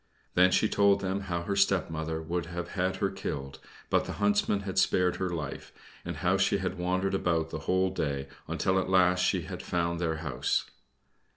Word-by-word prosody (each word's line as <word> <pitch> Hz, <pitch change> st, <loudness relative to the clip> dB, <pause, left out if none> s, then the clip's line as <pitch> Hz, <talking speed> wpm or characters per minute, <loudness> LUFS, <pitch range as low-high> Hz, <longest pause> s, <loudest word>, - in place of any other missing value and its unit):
Then 90 Hz, +1 st, +6 dB
she 110 Hz, -, +3 dB
told 100 Hz, -1 st, +4 dB
them 95 Hz, +1 st, -1 dB
how 85 Hz, -3 st, -3 dB
her 100 Hz, +3 st, -2 dB
stepmother 80 Hz, -5 st, 0 dB
would 85 Hz, +1 st, -2 dB
have 85 Hz, 0 st, -5 dB
had 95 Hz, 0 st, -1 dB
her -, -, -1 dB
killed, 70 Hz, 0 st, -5 dB, 0.3 s
but -, -, +3 dB
the -, -, -5 dB
Huntsman 100 Hz, 0 st, +1 dB
had 95 Hz, -1 st, -1 dB
spared 90 Hz, -1 st, +2 dB
her 95 Hz, -, -1 dB
life, 80 Hz, -5 st, -5 dB, 0.3 s
and -, -, -4 dB
how 95 Hz, +2 st, +2 dB
she 95 Hz, +1 st, +2 dB
had 95 Hz, -1 st, -3 dB
wandered 95 Hz, +2 st, 0 dB
about 85 Hz, -4 st, 0 dB
the -, -, -4 dB
Whole 95 Hz, 0 st, +2 dB
day 70 Hz, -6 st, -2 dB, 0.2 s
until 95 Hz, 0 st, +1 dB
at 95 Hz, -, -2 dB
last 90 Hz, -1 st, +4 dB
she -, -, +1 dB
had -, -, -6 dB
found 85 Hz, -1 st, -1 dB
their 80 Hz, -2 st, 0 dB
house. 65 Hz, -4 st, 0 dB
90 Hz, 190 wpm, -29 LUFS, 85-95 Hz, 0.3 s, Then